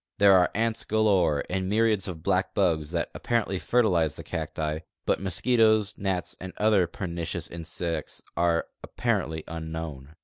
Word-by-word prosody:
There 100 Hz, -1 st, +7 dB
are 90 Hz, -1 st, +5 dB
ants 115 Hz, +1 st, 0 dB
galore, 95 Hz, -9 st, +2 dB
and 95 Hz, 0 st, -2 dB
myriads 110 Hz, -2 st, +2 dB
of 80 Hz, -4 st, -7 dB
black 95 Hz, 0 st, 0 dB
bugs 80 Hz, -6 st, +1 dB
that 85 Hz, 0 st, -2 dB
apparently 110 Hz, -5 st, -1 dB
fertilize 90 Hz, -12 st, +2 dB
the -, -, -8 dB
cacti, 80 Hz, -1 st, -3 dB, 0.3 s
but -, -, +1 dB
mosquitoes, 110 Hz, +2 st, +3 dB
gnats, 95 Hz, -3 st, -2 dB
and 95 Hz, 0 st, -7 dB
other 105 Hz, -4 st, +3 dB
])ernicious 85 Hz, -1 st, -4 dB
insects 85 Hz, -1 st, -5 dB
are 85 Hz, -1 st, +2 dB, 0.2 s
apparently 80 Hz, 0 st, -1 dB
unknown. 80 Hz, -3 st, -6 dB
90 Hz, 140 wpm, -27 LUFS, 80-105 Hz, 0.3 s, There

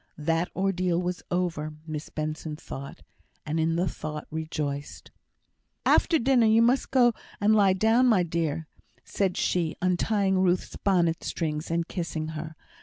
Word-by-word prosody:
That 165 Hz, +3 st, 0 dB
ordeal 185 Hz, -2 st, +1 dB
was 180 Hz, 0 st, -3 dB
over, 170 Hz, -4 st, -2 dB
Miss 155 Hz, -2 st, -5 dB
Benson 155 Hz, 0 st, -4 dB
thought, 140 Hz, -2 st, -9 dB, 0.4 s
and 155 Hz, +2 st, -1 dB
in 165 Hz, +1 st, +1 dB
the 175 Hz, +2 st, +1 dB
thought 150 Hz, -2 st, -5 dB
rejoiced. 150 Hz, -3 st, -4 dB, 0.7 s
"After 330 Hz, -, +4 dB
dinner, 250 Hz, -4 st, +3 dB
you 225 Hz, +1 st, +5 dB
must 250 Hz, +3 st, +2 dB
go 245 Hz, -3 st, +4 dB, 0.3 s
and 210 Hz, +1 st, +4 dB
lie 200 Hz, -3 st, +5 dB
down, 225 Hz, +6 st, +3 dB
my 210 Hz, -7 st, +4 dB
dear," 160 Hz, -2 st, -2 dB, 0.4 s
said 190 Hz, -3 st, -1 dB
she, 170 Hz, -3 st, 0 dB
untying 190 Hz, +2 st, +1 dB
Ruth's 185 Hz, -1 st, +1 dB
bonnet 170 Hz, -4 st, +1 dB
strings, 155 Hz, -1 st, -3 dB
and 165 Hz, 0 st, -1 dB
kissing 160 Hz, -3 st, -4 dB
her. 160 Hz, 0 st, -6 dB
175 Hz, 145 wpm, -27 LUFS, 155-195 Hz, 0.7 s, you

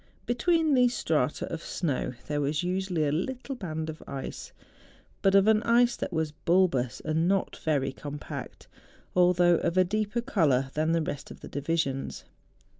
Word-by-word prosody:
Between 315 Hz, +5 st, +2 dB
these 250 Hz, -2 st, +4 dB
strata 150 Hz, -4 st, 0 dB
of 165 Hz, -, -4 dB
snow 145 Hz, -9 st, -2 dB
there 150 Hz, -1 st, -1 dB
was 150 Hz, +3 st, 0 dB
usually 180 Hz, -3 st, 0 dB
a 145 Hz, -, +1 dB
little 255 Hz, -, -3 dB
band 160 Hz, -9 st, -4 dB
of 155 Hz, 0 st, -7 dB
ice, 135 Hz, -1 st, -6 dB, 0.7 s
but 195 Hz, 0 st, +4 dB
of 195 Hz, 0 st, +6 dB
an 215 Hz, 0 st, +4 dB
ice 240 Hz, +1 st, +3 dB
that -, -, -4 dB
was 160 Hz, -3 st, -1 dB
bulbous 155 Hz, -6 st, +1 dB
and 160 Hz, +2 st, +1 dB
not 195 Hz, 0 st, 0 dB
very 140 Hz, -4 st, 0 dB
compact, 145 Hz, +2 st, -8 dB, 0.5 s
although 175 Hz, -1 st, +5 dB
of 170 Hz, -, -1 dB
a 185 Hz, -, +7 dB
deeper 215 Hz, +4 st, -1 dB
colour 145 Hz, -, +1 dB
than 155 Hz, +2 st, +1 dB
the 165 Hz, -1 st, +2 dB
rest 145 Hz, -2 st, -5 dB
of -, -, -11 dB
the -, -, -8 dB
divisions. 145 Hz, -2 st, -2 dB
170 Hz, 165 wpm, -28 LUFS, 150-200 Hz, 0.7 s, a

